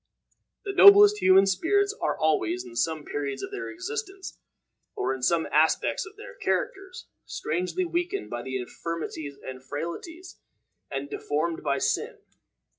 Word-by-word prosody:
The 395 - -3
noblest 410 +1 +8
human 190 +1 +6
spirits 400 - +1
are - - 0
always, 125 -6 0
in 120 -1 -12
some 155 +4 -1
periods 140 -2 -4
of 390 - -6
their 405 -1 -5
existence, 385 +1 -6 0.6
or 130 +1 -1
in 130 - -7
some 165 +5 +2
aspects 160 - +2
of 410 - -14
their - - -10
characters, 390 -5 -3 0.2
strangely 180 - -2
weakened 355 +3 -3
by 120 - -4
infirmities 140 +3 -5
and 130 0 -8
frailties, 245 - -7 0.5
and 135 0 -4
deformed 155 +3 -2
by 140 -1 0
sin. - - -1
170 Hz, 135 wpm, -26 LUFS, -, 0.6 s, noblest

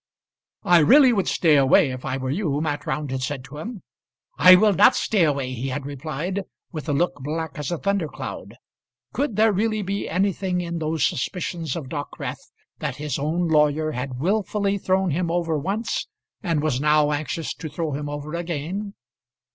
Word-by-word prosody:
"I 175 -1 +6
really 260 - +6
would 195 -5 0
stay 155 -4 +4
away 135 0 +4
if 130 0 -7
I 130 - -2
were 130 0 -3
you," 150 -4 -1
Mat 150 -2 -3
Round 140 0 -2
had 130 0 -2
said 130 0 -3
to 145 +3 -10
him. 220 +1 -7 0.5
"I 185 - +9
will 210 +2 +4
not - - +6
stay 205 -5 +2
away," 140 -4 -1
he 125 +2 -4
had 135 +1 -4
replied, 155 +7 -4 0.3
with 155 -1 -6
a - - +1
look 175 +5 +1
black 155 +3 -3
as 145 - -3
a 175 - -1
thundercloud. 200 -4 -3 0.6
Could 275 -6 -1
there 220 +1 +4
really 215 +2 0
be 200 +1 -3
anything 185 0 0
in 170 -1 -3
those 155 0 0
suspicions 170 +3 -2
of 160 -6 -5
Dockwrath, 145 -2 -6 0.3
that - - -3
his 150 -1 -3
own 165 +5 0
lawyer 155 0 +2
had 125 -2 -5
wilfully 200 +3 0
thrown 190 -1 +1
him 170 +3 -1
over 170 -1 0
once, 195 +10 -2 0.3
and 165 -6 0
was 140 -4 0
now 150 0 +3
anxious 155 +2 -3
to 160 - -7
throw 155 +1 -3
him 145 +1 -4
over 145 +1 -6
again? 175 +4 -4
160 Hz, 180 wpm, -23 LUFS, 145-185 Hz, 0.6 s, I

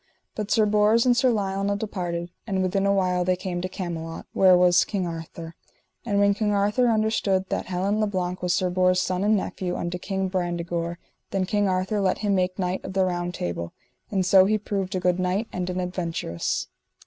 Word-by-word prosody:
But 210 -1 -4
Sir 220 -1 +4
Bors 210 +3 +3
and 245 -1 +4
Sir 250 +1 +3
Lionel 200 -2 0
departed, 175 -5 -4 0.2
and 190 -3 0
within 195 +2 +1
a - - +3
while 185 -2 +1
they 185 +1 +2
came 180 -1 -4
to 185 - -3
Camelot, 165 -3 -5
where 185 -2 +6
was 180 0 +5
King 195 -4 -2
Arthur. 165 0 -7 0.5
And 200 -2 +1
when 200 0 +4
King 210 0 0
Arthur 205 +5 +2
understood 215 -4 +1
that - - -2
Helin 190 +3 0
le 215 - +2
Blank 185 -2 -3
was 180 0 0
Sir 185 -1 0
Bors' 185 0 +3
son, 185 +1 -1
and 210 +1 +3
nephew 180 -2 -3
unto 175 +1 -3
King 190 +1 -2
Brandegore, 175 -2 -2 0.3
then 190 -1 0
King 205 +1 +1
Arthur 185 +3 0
let 185 -1 +1
him 205 -2 0
make 185 -1 0
knight 185 -1 -2
of - - -6
the 190 -1 +2
Round 175 -1 -2
Table; 85 -1 -4 0.4
and 190 -3 0
so 190 0 +6
he 215 +2 +2
proved 195 -2 -3
a - - 0
good 180 0 +1
knight 185 +5 0
and 180 0 -3
an 180 0 -2
adventurous. 170 - -2
185 Hz, 205 wpm, -25 LUFS, 180-200 Hz, 0.5 s, where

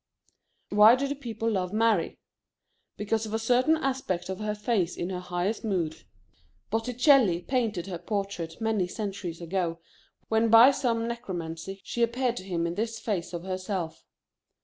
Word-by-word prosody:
Why 210 +3 +8
do 275 +2 -1
the 280 - -1
people 230 -5 -3
love 185 -3 -1
Mary? 215 -4 +1 0.8
Because 220 +1 -1
of 215 - -3
a - - +2
certain 250 +7 +3
aspect 260 - -2
of 190 - -4
her 210 0 -2
face 210 -5 0
in 175 +2 -3
her 180 - -3
highest 180 +4 -2
mood. 175 -7 -2 0.7
Botticelli 240 - +3
painted 225 -9 -1
her 180 -3 -5
portrait 195 -6 -4
many 220 -5 0
centuries 190 -4 -5
ago 170 -1 -2 0.5
when 225 +1 +2
by 230 +4 +9
some 230 -4 0
necromancy 190 -5 -5
she 235 - -4
appeared 240 +1 +1
to - - -5
him 175 -3 -2
in 170 - -2
this 225 +3 -3
phase 185 -6 -3
of 175 -1 -5
herself. 185 -3 -4
210 Hz, 155 wpm, -28 LUFS, 180-230 Hz, 0.8 s, by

